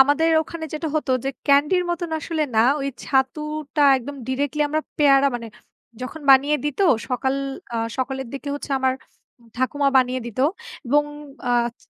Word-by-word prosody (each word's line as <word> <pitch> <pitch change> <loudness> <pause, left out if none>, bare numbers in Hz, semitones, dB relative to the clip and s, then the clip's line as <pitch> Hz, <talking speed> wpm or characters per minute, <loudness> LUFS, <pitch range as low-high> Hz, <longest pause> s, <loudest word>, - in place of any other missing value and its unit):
আমাদের 290 +4 +4
ওখানে 320 +1 -7
যেটা 315 +1 -3
হতো, 300 - -2
যে 270 - 0 0.2
ক্যান্ডির 295 +6 +4
মতোন 345 -1 -3
আসলে 315 +1 -2
না, - - +6 0.2
ওই 275 - -1 0.2
ছাতুটা 300 +3 -1 0.2
একদম 280 +3 -8
ডিরেক্টলি 285 +3 0
আমরা 310 +1 0 0.2
পেয়ারা 280 -2 +5
মানে 230 -1 -8 0.6
যখন 280 +5 -6
বানিয়ে 280 +3 +6
দিত, 295 +4 -2 0.3
সকাল 265 +1 0 0.4
আ - - 0 0.2
সকালের 265 -1 -3
দিকে 280 +1 -6
হচ্ছে, 290 - -7
আমার 260 0 +2 0.6
ঠাকুমা 275 +2 +1
বানিয়ে 255 0 +1
দিত। 235 0 -9 0.5
এবং 295 +4 +3 0.5
আচ 240 -1 +1
280 Hz, 150 wpm, -22 LUFS, 260-300 Hz, 0.6 s, না